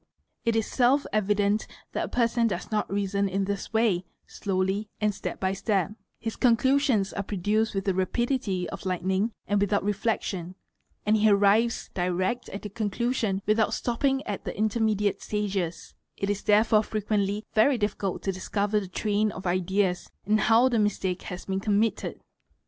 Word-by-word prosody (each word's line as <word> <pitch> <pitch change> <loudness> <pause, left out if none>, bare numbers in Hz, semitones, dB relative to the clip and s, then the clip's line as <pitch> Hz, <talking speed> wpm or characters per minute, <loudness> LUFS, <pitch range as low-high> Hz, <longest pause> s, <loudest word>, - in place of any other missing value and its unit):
It 230 -1 +2
is 225 -2 +2
self 265 +3 +2
evident 210 0 +1 0.2
that - - -1
a - - -8
person 235 -1 +2
does 190 -2 -4
not 210 -2 -1
reason 200 0 0
in 195 +1 0
this 200 0 -4
way, 220 -5 +2 0.2
slowly 195 +2 -2
and 210 -1 +1
step 200 - -5
by 190 0 0
step; 195 -1 0 0.3
his 225 -1 -4
conclusions 250 -3 +3
are 200 - -2
produced 205 +3 0
with 195 - -1
the 195 - +2
rapidity 195 0 0
of 195 - -6
_ - - -13
lightning 190 +4 0
and 205 -1 +1
without 205 0 +1
reflection, 195 -3 -2 0.5
and 215 +1 +4
he 215 0 +4
arrives 205 +3 +3
direct 185 +6 -1
at 200 - -7
the 210 - -5
conclusion 215 -1 -1
without 215 +1 +2
stopping 270 +3 0
at 205 - -4
the - - -5
intermediate 215 -1 +1
stages; 195 -5 -3 0.2
it 200 +1 0
is 205 - -3
therefore 215 0 +4
frequently 210 -1 -1
yery 240 +4 +4
difficult 205 -2 -2
to 195 - 0
discover 205 +2 -1
the 195 - -6
train 210 +3 0
of 190 - -9
ideas 185 +1 0 0.2
and 215 +2 +3
how 230 +4 +5
the 240 -3 +1
mistake 195 -3 0
has 180 0 -7
been 190 0 -1
committed. 210 +2 0
205 Hz, 165 wpm, -27 LUFS, 195-220 Hz, 0.5 s, how